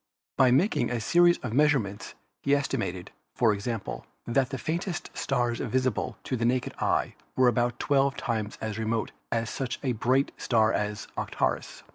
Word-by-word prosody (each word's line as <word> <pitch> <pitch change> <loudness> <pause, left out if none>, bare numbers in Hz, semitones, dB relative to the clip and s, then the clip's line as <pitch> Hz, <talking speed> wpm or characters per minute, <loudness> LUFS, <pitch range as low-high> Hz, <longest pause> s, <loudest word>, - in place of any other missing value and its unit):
By 130 - +5
making 150 - +3
a 125 -1 -1
series 175 +9 +5
of 115 -3 -3
measurements 130 -8 +1 0.3
he 140 +1 +3
estimated, 95 -10 -2 0.2
for 115 -3 +4
example, 110 +3 -4 0.2
that 125 +1 +1
the 135 - -3
faintest 170 +6 -3
stars 120 -3 0
visible 130 -3 -1
to 130 - -2
the 115 - -2
naked 125 +1 +1
eye - - +1 0.2
were 130 -1 +5
about 120 0 +2
twelve 140 -1 +2
times 110 -2 -2
as 110 -1 -3
remote 110 0 -1 0.2
as 115 -1 -1
such 130 -2 -3
a 130 - +1
bright 125 +4 +1
star 110 -2 +2
as 105 0 -2
Arcturus. - - -2
125 Hz, 160 wpm, -28 LUFS, 110-135 Hz, 0.3 s, By